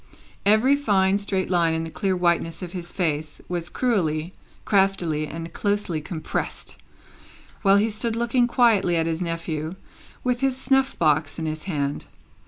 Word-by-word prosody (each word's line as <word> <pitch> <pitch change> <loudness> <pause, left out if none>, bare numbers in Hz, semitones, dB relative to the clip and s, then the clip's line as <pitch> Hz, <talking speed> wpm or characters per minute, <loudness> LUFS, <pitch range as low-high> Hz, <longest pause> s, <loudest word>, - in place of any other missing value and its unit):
Every 220 +7 +5
fine 200 -8 +2
straight 195 -2 -1
line 170 -2 +3
in 160 - -1
the 165 - -6
clear 190 +1 -1
whiteness 170 -1 0
of 175 - -6
his 175 -2 -6
face, 155 -4 -2
was 175 -1 -3
cruelly, 175 -9 0 0.3
craftily, 185 -6 +1
and 165 +2 -7
closely 205 -6 -1
compressed, 155 +1 -4 0.9
while 195 -1 +5
he 215 +2 +2
stood 220 +2 -2
looking 235 +1 +2
quietly 225 -8 +3
at 165 -1 +1
his 165 +1 -2
nephew, 165 -1 -3 0.5
with 250 -1 0
his 270 -1 +1
snuff 270 0 +1
box 155 -2 +2
in 160 - -3
his 155 0 -4
hand. 145 -4 -2
180 Hz, 155 wpm, -24 LUFS, 160-210 Hz, 0.9 s, Every